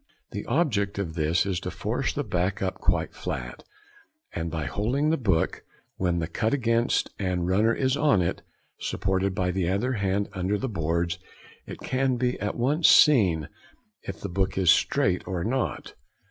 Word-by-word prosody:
The 100 - -5
object 115 - +1
of 95 -5 -3
this 80 +2 +1
is 95 -3 -1
to - - -5
force - - -2
the - - -2
back 90 +3 -1
up 95 -1 -2
quite - - 0
flat, - - -5 0.7
and 85 0 -3
by 80 -2 -3
holding 125 - 0
the - - +3
book 95 - 0 0.4
when 90 -2 0
the 85 - -1
cut 110 - 0
against 115 -2 +1
and 90 -3 -1
runner 105 +5 +3
is 130 +2 +1
on 145 -8 +3
it, 85 - -1 0.4
supported 95 0 -1
by 90 -1 0
the 90 -1 -1
other 110 +7 0
hand 100 -2 0
under 95 +2 -1
the 130 - -3
boards, 85 -4 -1 0.5
it - - -7
can 130 -1 0
be 125 0 -1
at 105 +1 -2
once 145 +7 +3
seen 95 - +5 0.5
if - - -7
the - - -4
book 95 +2 -1
is 90 -4 +5
straight 90 0 +1
or 90 -2 -2
not. 130 +3 -2
95 Hz, 175 wpm, -26 LUFS, 90-120 Hz, 0.7 s, seen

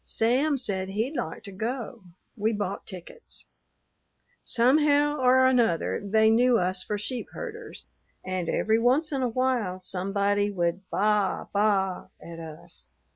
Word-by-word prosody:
Sam 265 +6 +1
said 190 -6 -2
he'd 225 +9 -2
like 160 - -4
to 200 - -8
go. 230 +1 -5 0.3
We 220 0 0
bought 205 -2 -4
tickets. 185 - -10 1.0
"Somehow 290 +4 +3
or 260 0 +5
another 235 -12 +2
they 220 +2 +3
knew 245 +1 +4
us 185 -1 0
for 210 - -3
sheep 235 +4 -4
herders, 480 -1 -8 0.4
and 185 -2 -2
every 220 +1 +2
once 265 +7 +2
in 275 -2 -1
a 250 - +1
while 235 -7 0
somebody 200 +2 0
would 180 0 -2
baa 210 -1 +1
baa 200 -3 +1
at 165 0 -10
us. 160 - -8
215 Hz, 135 wpm, -26 LUFS, 190-255 Hz, 1.0 s, or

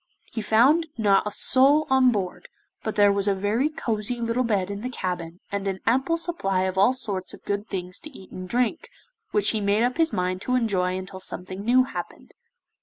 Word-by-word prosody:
He 225 - -2
found 260 +10 +4
not 205 -2 +3
a - - -3
soul 275 +8 +4
on 260 -1 +5
board, 190 -5 -4 0.3
but 220 - -4
there 205 -2 +5
was 200 0 -1
a 200 - +2
very 210 +9 0
cosy 235 -5 -3
little 230 +1 0
bed 200 -5 0
in 200 0 -5
the 250 - -3
cabin, 175 -6 -5
and 200 0 -2
an 190 -1 -2
ample 265 +8 +2
supply 195 - 0
of 185 0 -1
all 200 +7 +4
sorts 195 -7 -3
of - - -22
good 205 +1 -2
things 180 -1 -4
to 305 - -9
eat 190 -10 -14
and 185 0 -8
drink, 250 - 0 0.4
which 210 0 +2
he 220 - -2
made 205 +2 +2
up 250 +4 0
his 325 -1 +3
mind 185 -1 -2
to 250 - 0
enjoy 185 -6 0
until 185 0 -7
something 185 +1 -5
new 250 +3 +4
happened. 260 - -8
210 Hz, 205 wpm, -25 LUFS, 190-250 Hz, 0.4 s, on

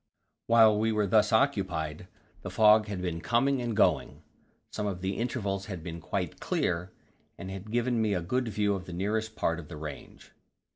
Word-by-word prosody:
While 110 -2 +6
we 110 +1 +2
were 105 -1 +1
thus 105 +2 +3
occupied, 90 - 0 0.3
the - - -6
fog 105 0 +5
had 95 -3 -4
been 85 -2 -3
coming 125 +5 +1
and 120 -3 -3
going; - - +1 0.5
some 105 - -3
of 90 -3 -4
the 95 +1 -2
intervals 100 -5 -2
had 95 -6 -6
been 85 0 -6
quite - - -3
clear, 90 +1 -1 0.5
and 95 +2 -7
had 95 +2 -8
given 120 0 +1
me 105 -2 +1
a 90 - -1
good 125 +7 -1
view 105 -2 0
of 95 -2 -4
the 90 - -8
nearest 110 +4 -2
part 85 -5 0
of 75 - -10
the 80 - -8
range. 75 0 -9
105 Hz, 190 wpm, -29 LUFS, 90-110 Hz, 0.5 s, While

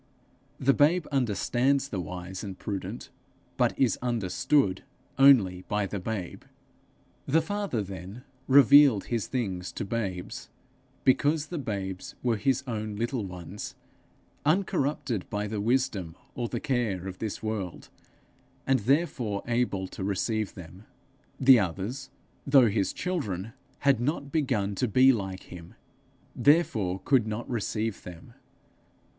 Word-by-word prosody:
The 135 +1 +4
babe 155 +4 +3
understands 135 +2 +1
the 100 - -3
wise 90 +3 -6
and 95 -3 -6
prudent, 100 -1 -5 0.4
but - - +1
is 130 - +2
understood 120 -1 +1 0.4
only 110 -10 +6
by 105 -1 0
the 100 +1 -4
babe. 95 -2 -5 0.9
The 155 +4 +4
Father, 190 - -2
then, 95 +4 -9 0.2
revealed 140 -4 +7
his 115 -4 -1
things 95 -8 -3
to - - -4
babes, 95 -5 -4 0.5
because 145 +3 +3
the 165 +1 -5
babes 95 -7 -5
were 120 -3 +1
his 135 +5 +1
own 110 -4 -4
little 115 -1 -2
ones, 90 +2 -8 0.7
uncorrupted 145 - 0
by 105 0 -2
the 105 0 -3
wisdom 105 -8 0 0.2
or 120 -2 -3
the 120 - -3
care 110 -9 -1
of 95 -1 -7
this 110 0 -4
world, 105 -5 -4 0.8
and 135 -1 +3
therefore 120 -4 0
able 115 -6 0
to - - -7
receive 105 +2 -1
them. 90 +2 -11 0.6
The 130 -2 +7
others, 100 +8 -3 0.4
though 135 -4 +6
his 100 -2 0
children, 115 - -3 0.3
had 140 -4 +3
not 140 +2 -2
begun 105 -10 0
to 125 - +1
be 130 +4 +6
like 95 -4 -4
him, 85 -1 -11 0.6
therefore 110 - +2
could 130 -6 +3
not 110 +2 -4
receive 110 -2 -2
them. 85 -2 -11
110 Hz, 130 wpm, -28 LUFS, 95-135 Hz, 0.9 s, revealed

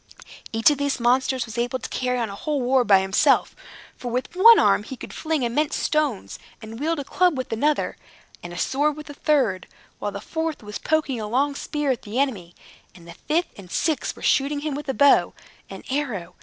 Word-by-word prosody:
Each 225 +5 +4
of 290 - -2
these 285 -2 -1
monsters 255 +1 +1
was 230 0 -6
able 245 +2 -1
to - - -8
carry 250 -1 -1
on 235 -2 -1
a - - -7
whole 295 +6 -2
war 255 0 +2
by 195 -4 +5
himself, 190 +1 +2 0.4
for 245 - -6
with 250 +8 -3
one 455 +5 +8
arm - - +4
he 255 +5 -8
could - - -9
fling 315 -4 -2
immense 280 +6 0
stones, 295 -10 -1 0.2
and 225 0 -9
wield 320 +3 0
a 285 - -3
club 355 +1 +1
with 255 -3 -4
another, 295 +6 0 0.4
and 175 - -8
a 175 - -8
sword 290 +8 0
with 300 -1 -9
a - - -9
third, 260 - 0 0.3
while 205 - -3
the 200 - -6
fourth 320 +3 -4
was 210 0 -7
poking 305 -7 0
a 210 - -4
long 275 +6 +1
spear 295 0 -2
at 250 - -3
the 215 +2 -6
enemy, 210 -11 -1 0.4
and 170 -2 -15
the 170 - -9
fifth 330 +4 -2
and 185 -2 -12
sixth 310 - -1
were - - -13
shooting 285 +1 +1
him 305 -1 -3
with 290 0 -6
a 270 - -1
bow 280 +5 +4 0.3
and - - -10
arrow. 250 -11 -3
265 Hz, 215 wpm, -23 LUFS, 225-295 Hz, 0.4 s, one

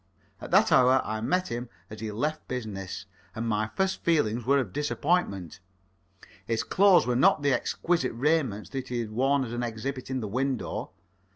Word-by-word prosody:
At - - -7
that - - +4
hour 130 +1 +6
I 110 0 -3
met 180 +10 0
him 120 +1 -4 0.2
as 110 - -8
he 110 -1 -4
left 150 +9 -3
business, 105 -7 -5 0.3
and 115 +1 -3
my 110 -1 0
first 190 0 0
feelings 120 -8 +1
were 140 +1 +5
of 120 -9 -2
disappointment. 145 - -1 0.9
His 115 -1 0
clothes 195 -2 +5
were 125 0 0
not 140 +3 +4
the 140 -1 +3
exquisite 150 +2 0
raiment 130 -5 0
that 135 -2 -4
he 125 - -3
had 110 -2 -6
worn 135 +4 +2
as 115 - -7
an 120 - -2
exhibit 125 +3 -4
in 130 -1 -1
the 110 - -4
window. 130 +4 -2
125 Hz, 180 wpm, -27 LUFS, 110-140 Hz, 0.9 s, hour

